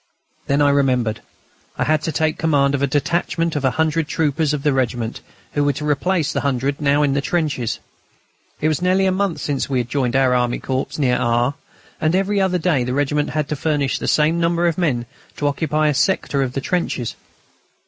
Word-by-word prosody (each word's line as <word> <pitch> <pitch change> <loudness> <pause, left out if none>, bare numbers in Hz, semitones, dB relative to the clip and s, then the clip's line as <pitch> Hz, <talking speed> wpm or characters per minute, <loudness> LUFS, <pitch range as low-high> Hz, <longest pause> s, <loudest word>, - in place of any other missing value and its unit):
Then 140 +1 +2
I 145 - +4
remembered: 125 -6 +1 0.6
I - - +1
had 155 0 +2
to 160 - -2
take 155 0 0
command 140 -3 +2
of 140 - -1
a 140 - +2
detachment 165 +3 0
of 145 - -1
a 130 - +4
hundred 160 0 +1
troopers 155 -1 0
of 150 -2 -2
the 150 - +2
regiment, 120 -3 -2 0.3
who 145 - +1
were 145 0 +2
to 150 +2 -4
replace 155 +3 0
the - - -1
hundred 140 +1 -1
now 145 0 +3
in 140 -2 +2
the 140 - +1
trenches. 145 - -1 0.8
It 155 - +1
was 155 -1 0
nearly 185 +1 +2
a 190 - +3
month 190 -2 -1
since 140 -2 -2
we 135 - 0
had 120 -1 -1
joined 125 -2 0
our 135 -1 +3
Army 120 -1 +1
Corps 130 0 -3
near 125 -4 +2
R., 120 +3 +1 0.5
and 155 +2 +2
every 195 +1 +1
other 185 -1 +2
day 160 -7 +1
the 125 +1 -2
regiment 145 +1 0
had 150 -2 -1
to 150 - -1
furnish 145 -2 0
the - - -4
same 155 +2 +2
number 170 +1 +1
of 170 -2 +2
men 140 -10 0 0.3
to 145 - -2
occupy 155 +1 0
a 150 - +2
sector 145 -1 +1
of 130 -2 -1
the 135 - -2
trenches. 155 - -2
145 Hz, 210 wpm, -20 LUFS, 135-160 Hz, 0.8 s, I